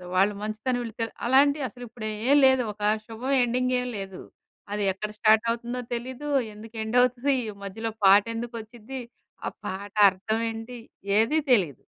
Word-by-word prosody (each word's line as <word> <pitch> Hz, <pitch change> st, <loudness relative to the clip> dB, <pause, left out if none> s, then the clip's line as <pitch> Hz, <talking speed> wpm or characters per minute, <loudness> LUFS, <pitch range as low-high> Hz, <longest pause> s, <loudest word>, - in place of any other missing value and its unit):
వాళ్ళ 195 Hz, +3 st, +4 dB
మంచితనం 220 Hz, +4 st, -2 dB
వీళ్ళు 230 Hz, -1 st, -6 dB
తెల్ 225 Hz, -, -2 dB
అలాంటియసలిప్పుడేం 245 Hz, -3 st, +1 dB
లేదు. 260 Hz, -1 st, +5 dB
ఒకా 210 Hz, 0 st, 0 dB, 0.2 s
శుభం 245 Hz, +5 st, -3 dB
ఎండింగేం 250 Hz, +1 st, 0 dB
లేదు. 195 Hz, -1 st, -7 dB, 0.5 s
అది 205 Hz, -1 st, -1 dB
ఎక్కడ 210 Hz, +3 st, -5 dB
స్టార్టవుతుందో 230 Hz, +2 st, +2 dB
తెలీదు, 260 Hz, +4 st, -5 dB, 0.3 s
ఎందుకు 220 Hz, +2 st, -12 dB
ఎండవుతదీ, 250 Hz, +4 st, +2 dB, 0.3 s
మధ్యలో 220 Hz, +3 st, -4 dB
పాటెందుకచ్చిద్దీ, 230 Hz, +4 st, +1 dB, 0.5 s
ఆ -, -, 0 dB, 0.2 s
పాట 195 Hz, +1 st, -6 dB, 0.2 s
అర్థవేంటి, 225 Hz, +5 st, -3 dB, 0.4 s
ఏదీ 295 Hz, +8 st, +3 dB
తెలీదు. 170 Hz, -, +1 dB
230 Hz, 115 wpm, -26 LUFS, 215-250 Hz, 0.5 s, లేదు